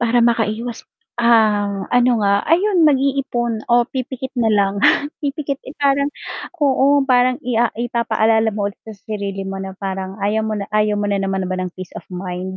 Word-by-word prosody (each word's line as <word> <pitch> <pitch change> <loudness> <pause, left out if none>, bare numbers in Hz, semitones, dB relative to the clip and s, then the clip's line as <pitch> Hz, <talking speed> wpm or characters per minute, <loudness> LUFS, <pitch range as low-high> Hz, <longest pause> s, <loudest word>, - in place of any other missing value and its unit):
Para 240 0 +2
makaiwas, 225 +1 -1 0.4
ang 210 -4 +2
ano 245 0 +4
nga 200 - +4 0.2
ayon 360 -1 +4
mag-iipon 270 -3 0 0.2
o 240 - +5 0.2
pipikit 260 0 -4
na 225 - +3
lang 195 0 +2 0.5
pipikit 280 -1 -3
eh, 270 - -9
parang 280 0 +3 0.6
oo 270 -1 +3 0.2
parang 250 0 +4
i 250 - -2
ah, 240 - +3 0.2
ipapa-alala 225 -2 +1
mo 205 - -1
ulit 200 - -7
sa 220 - -7
sarili 200 -2 -4
mo 195 - -5
na 195 0 -6
parang 190 -1 -3
ayaw 215 +2 +1
mo 215 - -1
na 200 - -3
ayaw 210 0 +2
mo - - -1
na 200 -1 0
naman 195 -1 -1
ba 185 - -1
ng 185 - -2
peace 185 -1 -9
of - - -28
mind 185 0 -5
225 Hz, 180 wpm, -19 LUFS, 200-255 Hz, 0.6 s, o